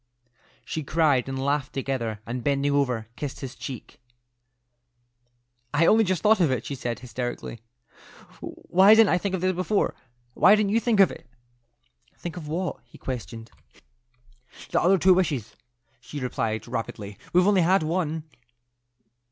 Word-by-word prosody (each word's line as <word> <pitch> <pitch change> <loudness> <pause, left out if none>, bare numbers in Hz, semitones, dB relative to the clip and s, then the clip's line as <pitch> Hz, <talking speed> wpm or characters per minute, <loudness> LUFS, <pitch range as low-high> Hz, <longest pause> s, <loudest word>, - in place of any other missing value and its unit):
She 160 - -4
cried 145 -4 +2
and 135 - -4
laughed 140 0 -1
together, 120 -6 -3
and 120 +1 -5
bending 140 +1 +1
over, 125 -6 0
kissed 145 -3 -6
his 135 -2 -6
cheek. 130 -1 -9 1.7
"I 160 +3 +4
only 220 +5 +5
just 185 -4 -1
thought 220 0 +5
of 170 -5 +3
it," 125 -3 -2
she - - -4
said, 120 -3 -4
hysterically. 120 -1 -6 0.8
"Why 195 +4 +4
didn't 225 -1 +5
I 180 - +3
think 195 0 -2
of 185 - -5
it 185 -1 +1
before? 185 +3 0 0.4
Why 200 +9 +6
didn't 210 -2 0
you 225 - +3
think 230 -3 +1
of 195 - +5
it?" - - -12 0.9
"Think 175 -1 -7
of 165 -4 -8
what?" 170 +3 -3
he 120 - -17
questioned. 115 -2 -7 1.2
"The - - +2
other 190 +3 +4
two 185 +2 +5
wishes," 145 - -1 0.4
she 135 +4 -8
replied, 115 -4 -3
rapidly. 110 -4 -5
"We've 180 +1 +4
only 200 -2 +4
had 180 +1 +3
one." 160 -1 -2
145 Hz, 150 wpm, -25 LUFS, 125-185 Hz, 1.7 s, Why